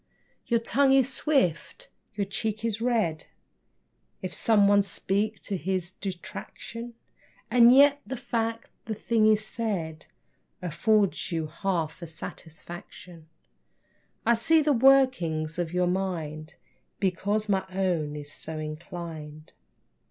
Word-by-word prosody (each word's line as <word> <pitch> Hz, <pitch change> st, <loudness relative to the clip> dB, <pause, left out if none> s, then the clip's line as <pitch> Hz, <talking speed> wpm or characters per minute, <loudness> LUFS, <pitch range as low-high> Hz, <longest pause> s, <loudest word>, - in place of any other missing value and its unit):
Your 235 Hz, -1 st, +3 dB
tongue 270 Hz, +4 st, +3 dB
is 270 Hz, -1 st, +3 dB
swift, 260 Hz, -, 0 dB, 0.3 s
your 200 Hz, -1 st, -1 dB
cheek 215 Hz, +2 st, -3 dB
is 225 Hz, -1 st, -2 dB
red, 220 Hz, -10 st, 0 dB, 1.0 s
If 185 Hz, -, -4 dB
some 210 Hz, -3 st, +4 dB
one 205 Hz, 0 st, +5 dB
speak 200 Hz, +1 st, -1 dB
to 200 Hz, -, -4 dB
his 185 Hz, +1 st, -2 dB
detraction, 210 Hz, +5 st, -7 dB, 0.6 s
And 240 Hz, 0 st, +7 dB
yet, 285 Hz, +2 st, +6 dB
the 260 Hz, +5 st, -5 dB
fact 230 Hz, -2 st, -3 dB
the 220 Hz, -, -3 dB
thing 215 Hz, +1 st, +2 dB
is 215 Hz, 0 st, +3 dB
said 180 Hz, -10 st, -4 dB, 0.5 s
Affords 195 Hz, +4 st, +1 dB
you 165 Hz, -2 st, -1 dB
half 165 Hz, 0 st, -2 dB
a 170 Hz, -, -6 dB
satisfaction. 165 Hz, +1 st, -10 dB, 1.0 s
I 235 Hz, -, +5 dB
see 315 Hz, +7 st, +4 dB
the 295 Hz, 0 st, +3 dB
workings 230 Hz, -, +3 dB
of 170 Hz, -2 st, -2 dB
your 180 Hz, 0 st, +1 dB
mind 170 Hz, -4 st, -3 dB, 0.4 s
Because 205 Hz, +3 st, 0 dB
my 195 Hz, -2 st, +1 dB
own 180 Hz, -6 st, -1 dB
is 145 Hz, -1 st, -7 dB
so 160 Hz, -1 st, -3 dB
inclined. 155 Hz, -1 st, -7 dB
195 Hz, 120 wpm, -27 LUFS, 165-230 Hz, 1.0 s, And